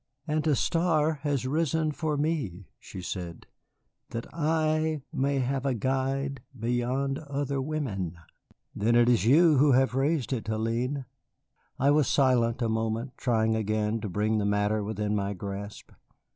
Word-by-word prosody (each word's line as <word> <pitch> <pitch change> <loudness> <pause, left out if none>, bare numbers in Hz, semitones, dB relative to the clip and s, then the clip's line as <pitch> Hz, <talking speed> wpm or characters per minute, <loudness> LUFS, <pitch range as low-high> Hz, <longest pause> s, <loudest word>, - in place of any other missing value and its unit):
"And 155 +1 0
a 150 - +4
star 160 -1 +1
has 140 -4 -1
risen 155 +2 +1
for 155 -1 -2
me," 140 - -2
she 95 - -9
said, 85 -2 -6 0.6
"that 115 - -5
I 155 -1 0
may 140 -1 +1
have 135 +1 -1
a 135 -2 0
guide 135 +3 -1 0.2
beyond 125 +4 -1
other 140 -2 -2
women." 120 - -3 0.6
"Then 115 +4 +2
it 120 0 +5
is 120 -2 +3
you 155 +3 +6
who 140 +1 +5
have 130 0 +3
raised 135 0 0
it, 115 -5 -3
Hélène." 115 +5 -1 0.7
I 140 +2 +3
was 150 -2 +3
silent 125 -3 +2
a - - +1
moment, 110 +3 -1
trying 110 -3 +1
again 110 0 -1
to 105 - -4
bring 105 +4 0
the - - 0
matter 105 +1 +1
within 105 0 -2
my 100 0 -1
grasp. 100 +2 -7
130 Hz, 150 wpm, -28 LUFS, 110-145 Hz, 0.7 s, you